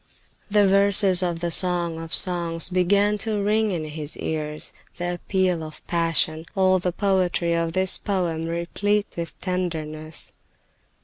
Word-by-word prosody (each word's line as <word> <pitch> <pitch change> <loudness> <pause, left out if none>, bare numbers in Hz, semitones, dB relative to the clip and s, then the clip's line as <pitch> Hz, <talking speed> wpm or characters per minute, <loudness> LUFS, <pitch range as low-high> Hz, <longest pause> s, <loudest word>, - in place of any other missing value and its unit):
The 205 -1 +4
verses 195 -1 +5
of 175 -2 -2
the 170 -1 -1
Song 175 -2 +3
of 165 0 -9
Songs 170 -2 +2
began 200 +3 +2
to 215 0 -1
ring 215 +2 +1
in 170 -5 -3
his 155 0 -4
ears, 150 -1 -3 0.2
the 175 0 -2
appeal 180 -1 -1
of 155 -1 -11
passion, 165 -1 -1
all 185 -1 +3
the 180 0 -1
poetry 180 -3 0
of 165 -1 -1
this 185 0 +3
poem 175 -5 -2
replete 200 +5 -1
with 170 -1 -6
tenderness. 160 -4 -4
175 Hz, 140 wpm, -23 LUFS, 165-190 Hz, 0.2 s, verses